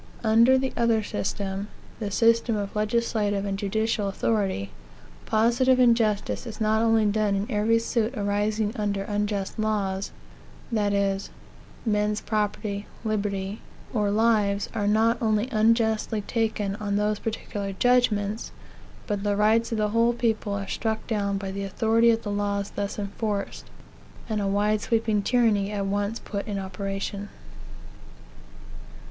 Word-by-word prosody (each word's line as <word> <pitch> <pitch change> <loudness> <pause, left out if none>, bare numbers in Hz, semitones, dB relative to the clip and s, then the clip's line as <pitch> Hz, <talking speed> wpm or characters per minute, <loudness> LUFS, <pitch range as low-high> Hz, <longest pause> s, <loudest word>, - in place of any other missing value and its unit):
Under 230 +4 +5
the 265 0 -1
other 230 -2 +2
system 195 0 -3 0.3
the 210 -3 -2
system 230 +2 +3
of 200 -1 -4
legislative 210 -2 0
and 200 -1 -1
judicial 210 +1 -1
authority 195 - -1 0.6
positive 240 +4 +3
injustice 230 -2 +2
is 220 -1 -7
not 220 0 +2
only 225 -1 +3
done 210 -1 +1
in 195 +1 -1
every 215 +2 +3
suit 230 +1 -1
arising 205 +1 0
under 205 -3 -1
unjust 205 0 -2
laws, 200 -3 -1 0.6
that 210 -3 +1
is, 200 0 0 0.6
men's 210 -1 +1
property, 210 -1 -2 0.2
liberty, 205 -2 -2 0.3
or 210 -4 +1
lives 210 -2 +2
are 205 -1 -1
not 220 +2 +3
only 215 0 +1
unjustly 220 -1 +2
taken 215 -2 -1
on 205 -1 -2
those 210 0 +1
particular 205 -2 -4
judgments, 220 -1 +1 0.5
but 205 -2 -2
the 205 0 0
rights 220 +3 +3
of 225 - -1
the 210 -1 +1
whole 230 +2 +3
people 220 -3 -1
are 200 -1 -3
struck 220 -1 -2
down 200 -3 -1
by 195 -1 -4
the 200 +1 -4
authority 225 +4 +3
of 225 0 +2
the 205 - -3
laws 205 0 -1
thus 200 0 -4
enforced, 205 0 -3 0.6
and 215 -2 -1
a 200 - 0
wide 205 +2 +1
sweeping 220 -2 +1
tyranny 210 -3 +2
at 200 -1 -2
once 205 +3 -1
put 200 0 -5
in 205 -2 -3
operation. 195 +1 -4
210 Hz, 140 wpm, -26 LUFS, 200-225 Hz, 0.6 s, Under